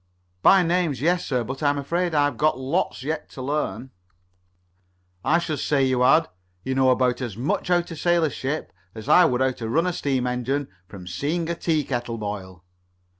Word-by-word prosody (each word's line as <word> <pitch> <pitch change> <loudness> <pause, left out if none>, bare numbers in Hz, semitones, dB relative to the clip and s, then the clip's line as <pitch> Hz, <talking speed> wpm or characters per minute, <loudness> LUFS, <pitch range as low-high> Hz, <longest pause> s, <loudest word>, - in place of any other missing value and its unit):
"By 195 -1 +6
names, 170 -6 0
yes, 175 +5 +1
sir. 125 -4 0
But 130 +5 -6
I'm 145 -1 +2
afraid 170 +4 -1
I've 145 -1 +2
got 155 -4 +1
lots 130 0 -2
yet 155 +2 -4
to 130 - -7
learn." 135 -3 -3 1.3
"I 165 - +3
should 155 -4 -2
say 140 -2 +1
you 130 -1 +1
had. 155 +6 +5 0.4
You 130 - -2
know 130 0 +3
about 125 0 +2
as 115 -5 -5
much 130 +7 -1
how 175 -1 +3
to 170 -1 -9
sail 175 +1 +2
a 155 - +1
ship 140 +4 -4 0.2
as 110 -1 -9
I 180 - +7
would 125 +1 +1
how 130 0 +3
to 115 -3 -6
run 165 +8 +2
a 180 - 0
steam 135 -5 -1
engine 125 +3 -2 0.2
from 95 -2 -11
seeing 150 - -2
a - - -2
tea 160 -2 0
kettle 120 -3 -3
boil." 95 -5 -6
140 Hz, 195 wpm, -24 LUFS, 125-160 Hz, 1.3 s, I